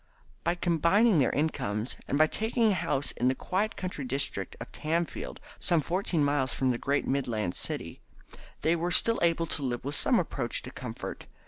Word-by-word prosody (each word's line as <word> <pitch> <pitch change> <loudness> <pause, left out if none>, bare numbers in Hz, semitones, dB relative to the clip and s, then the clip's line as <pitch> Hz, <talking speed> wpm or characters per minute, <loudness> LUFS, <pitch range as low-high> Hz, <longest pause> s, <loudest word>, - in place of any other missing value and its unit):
By 170 +1 +1
combining 175 +4 +3
their 130 - +4
incomes, 120 -7 -1
and 140 - 0
by 155 - +6
taking 220 +5 +1
a - - +3
house 165 -6 0
in 125 - 0
the 130 - +2
quiet 205 - -1
country 185 -6 -4
district 130 -7 0
of - - -8
Tamfield, 155 - -2 0.2
some 170 - +2
fourteen 170 0 0
miles 140 -2 +1
from 130 -1 +2
the 120 - -2
great 140 +1 0
Midland 115 -9 -1
city, - - -4 0.6
they 165 +2 +3
were 170 +1 -1
still 230 +6 +4
able 165 -1 +2
to 160 - -1
live 125 -2 -2
with 140 - -2
some - - +3
approach - - -1
to - - -8
comfort. - - -7
155 Hz, 185 wpm, -29 LUFS, 130-175 Hz, 0.6 s, by